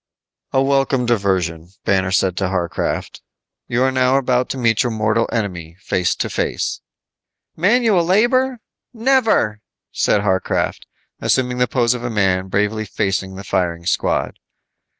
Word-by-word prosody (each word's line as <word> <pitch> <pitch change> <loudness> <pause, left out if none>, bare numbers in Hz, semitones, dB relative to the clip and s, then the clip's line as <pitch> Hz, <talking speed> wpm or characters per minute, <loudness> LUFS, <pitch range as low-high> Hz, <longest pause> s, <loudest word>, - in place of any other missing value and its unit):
"A 135 - +2
welcome 135 -2 +1
diversion," 95 -8 0
said 95 - -28
Banner 95 -1 +2
to 95 0 +1
Harcraft, 90 -3 -3 0.5
"you 120 +2 +1
are 130 - +2
now 130 0 +3
about 125 -2 +1
to - - -3
meet 115 -4 +2
your 120 - 0
mortal 110 +1 0
enemy 90 -6 -4
face 90 -2 0
to - - -2
face." - - -2 0.7
"Manual 205 +1 +3
labor? 240 +7 +2 0.3
Never," 225 - +2 0.3
said 105 - +1
Harcraft, 95 -2 -1 0.3
assuming 125 -1 0
the 125 - +3
pose 120 -2 +2
of 120 -1 -6
a 120 - -2
man 95 -4 +1
bravely 105 +3 0
facing 95 -2 -2
the 95 - -8
firing 90 -3 -1
squad. 95 - -1
110 Hz, 140 wpm, -19 LUFS, 95-130 Hz, 0.7 s, now